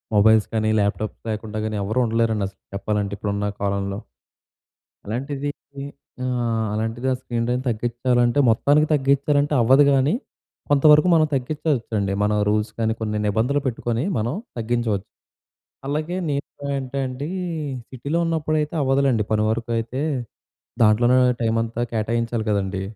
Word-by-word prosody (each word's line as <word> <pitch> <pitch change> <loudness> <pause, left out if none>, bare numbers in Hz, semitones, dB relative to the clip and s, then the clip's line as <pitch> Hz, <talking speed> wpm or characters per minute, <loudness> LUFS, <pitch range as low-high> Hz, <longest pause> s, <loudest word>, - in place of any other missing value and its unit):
Mobiles 110 +1 +5
కానీ, 110 0 +1
laptops 105 +1 -1
లేకుండా 110 0 -4
కానీ 110 -1 -2
ఎవరూ 110 +6 -1
ఉండలేరండి 110 -3 +1
అసలు - - -29
చెప్పాలంటే. 100 0 -1
ఇప్పుడున్న 105 0 -1
కాలంలో. 100 0 -1 1.1
అలాంటిది 135 +6 -3 0.3
ది 140 - -5 0.4
ఆహ్, 120 -3 0
అలాంటిది 115 +4 -2
ఆ - - +3
స్క్రీన్ 120 -2 -2
టైం 125 +1 +1
తగ్గించాలంటే 120 +2 +1
మొత్తానికి 145 +7 +3
తగ్గించాలంటే 145 +1 +2
అవ్వదు 130 +5 +6
గానీ. 135 +3 +3 0.6
కొంతవరకు 150 +3 +6
మనం 155 -1 +5
తగ్గిచ్చుకోవచ్చండి. 125 -7 -1
మన 105 - +2 0.2
రూల్స్ 105 +1 0
కానీ 110 0 +1
కొన్ని 105 -1 -2
నిబంధనలు 120 +8 +1
పెట్టుకొని 120 0 -1
మనం 115 +5 -1 0.2
తగ్గించవచ్చు. 115 -3 -1 0.8
అలాగే 155 +5 -2
నేను 140 0 -2 0.3
ఏంటండి 135 +1 -3 0.6
సిటీలో 140 +6 -2
ఉన్నప్పుడైతే 155 -1 0
అవ్వదులెండి 135 -4 +2
పని 105 0 +2
వరకు 115 +1 -2
అయితే, 130 +5 -3 0.8
దాంట్లోనే 120 +4 +4 0.2
టైం 115 -1 +1
అంతా 115 +1 -4
కేటాయించాలి 115 0 -1
కదండీ. 95 -1 -1
120 Hz, 125 wpm, -22 LUFS, 110-140 Hz, 1.1 s, అవ్వదు